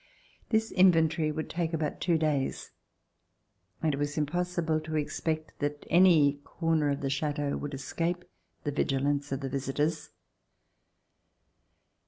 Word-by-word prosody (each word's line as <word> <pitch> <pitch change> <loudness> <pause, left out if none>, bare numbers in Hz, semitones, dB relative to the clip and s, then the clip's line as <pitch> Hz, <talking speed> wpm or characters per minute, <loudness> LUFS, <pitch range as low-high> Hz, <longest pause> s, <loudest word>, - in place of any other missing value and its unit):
This 220 0 +1
inventory 165 -4 +4
would 155 +1 -4
take 165 0 -2
about 155 -2 -2
two 170 -2 +3
days 150 -4 -1 1.1
and 155 -2 +2
it - - -2
was 145 +1 -2
impossible 165 +1 0
to 155 0 -5
expect 155 +1 -2
that 145 0 -3
any 160 -5 +5
corner 165 -3 0
of 140 0 -1
the 135 - -1
Chateau 145 0 -1
would 145 -1 -5
escape 170 +6 -2 0.4
the 145 - -1
vigilance 140 0 0
of 135 +1 -2
the 135 - -3
visitors. 140 +4 -1
155 Hz, 130 wpm, -29 LUFS, 145-165 Hz, 1.1 s, any